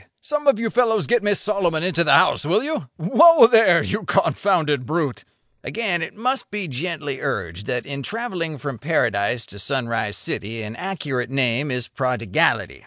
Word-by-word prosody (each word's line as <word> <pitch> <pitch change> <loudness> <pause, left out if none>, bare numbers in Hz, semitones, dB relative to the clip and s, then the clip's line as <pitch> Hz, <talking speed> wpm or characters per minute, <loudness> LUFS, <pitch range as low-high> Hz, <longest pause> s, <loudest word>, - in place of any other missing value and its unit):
some 295 -1 -3
of 275 - +5
you 225 -1 -2
fellows 225 -3 +2
get 240 -1 +2
Miss 205 -1 +1
Solomon 180 -6 -1
into 175 -2 +2
the 150 - +2
house, 140 - +4
will 185 - +1
you? 300 - -4
Whoa, 315 - +6
there! 225 -7 +5
you 210 - -2
confounded 160 -9 +1
brute!" 150 -4 -2 0.4
Again 185 -8 -2
must 255 +5 -1
it - - -49
be 205 -3 -4
gently 145 -1 -4
urged 100 - -4
that 125 -1 -2
in 140 0 -6
travelling 180 - -4
from 135 -2 -6
Paradise 115 -7 0
to 100 - -10
Sunrise 115 -3 -2
City 110 +2 -4
an 110 +1 -7
accurate 145 -9 -4
name 135 +1 0
is 125 -2 -2
prodigality. 125 -6 -1
155 Hz, 170 wpm, -21 LUFS, 125-205 Hz, 0.4 s, Whoa